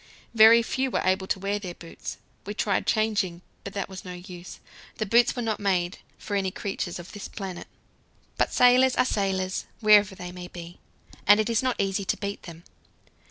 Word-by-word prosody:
Very 230 +1 +8
few 265 +3 -1
were - - -1
able 190 +1 +1
to - - 0
wear 200 +2 -2
their 180 -4 -7
boots. 165 - -8 0.3
We 205 +1 -6
tried 200 -2 0
changing, 205 -5 0 0.2
but 200 - -7
that 200 - -3
was 190 -1 -9
no 180 - -7
use; 180 0 -10 0.4
the 215 - -1
boots 235 +5 +4
were 245 - -3
not 220 -2 -1
made 185 -3 0 0.2
for 205 - -5
any 195 -1 +1
creatures 185 -2 -4
of 175 0 -10
this 205 - -7
planet. 190 -4 -7 0.7
But - - +1
sailors 250 +1 +5
are - - +3
sailors 190 -4 -1
wherever 210 -2 +5
they 180 -1 -7
may 180 0 -8
be; 175 -1 -10 0.5
it 210 +2 +5
is 225 - +2
not 255 -1 0
easy 195 0 0
to - - 0
beat 200 0 -5
them. 165 0 -12
200 Hz, 190 wpm, -26 LUFS, 185-215 Hz, 0.7 s, Very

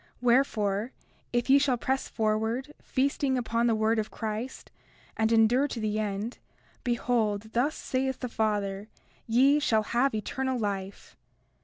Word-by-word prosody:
Wherefore, 235 -3 +1 0.4
if 240 0 0
ye 275 +1 +6
shall 275 -3 +2
press 265 +3 -1
forward, 225 +5 -1
feasting 270 0 0
upon 235 -1 0
the 230 - +3
word 220 +1 +2
of 215 - -2
Christ, 220 +3 -5 0.4
and 220 0 +1
endure 230 +5 +4
to 250 - -5
the 215 -1 -1
end, 210 +2 -3 0.4
behold, 225 -3 0
thus 270 +6 +1
saith 265 0 -2
the 250 - -2
Father: 210 -3 -1 0.4
Ye 265 +6 +4
shall 220 -7 +2
have 245 +3 +1
eternal 260 +5 -2
life. 200 -3 -4
230 Hz, 140 wpm, -28 LUFS, 215-260 Hz, 0.4 s, ye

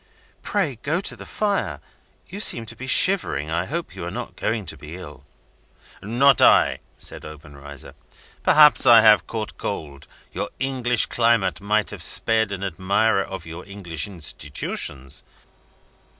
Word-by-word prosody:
"Pray 160 - -2
go 160 +4 -1
to 195 - -4
the - - -11
fire. 205 -2 -2 0.5
You 200 - -8
seem 115 - +1
to - - -10
be 130 - -8
shivering 105 - +2
I 85 +2 -1
hope 165 - -5
you 95 - -7
are 85 - -4
not - - -7
going 110 -1 -2
to 80 - -6
be 75 +3 -10
ill?" 75 -6 -11 0.8
"Not 120 +6 +3
I!" - - +5 0.2
said - - -7
Obenreizer. 70 -2 -11 0.5
"Perhaps 150 -3 +5
I 115 -2 +9
have 110 -1 +5
caught 110 -2 -5
cold. 75 -8 -6 0.2
Your - - -4
English 125 -3 +2
climate 115 -8 +1
might 105 +1 0
have - - -8
spared 110 -2 +1
an 100 -1 -5
admirer 100 +3 +1
of 95 -3 -8
your 85 +2 -9
English 95 -6 -4
institutions. 75 -5 -4
100 Hz, 150 wpm, -22 LUFS, 80-120 Hz, 0.8 s, I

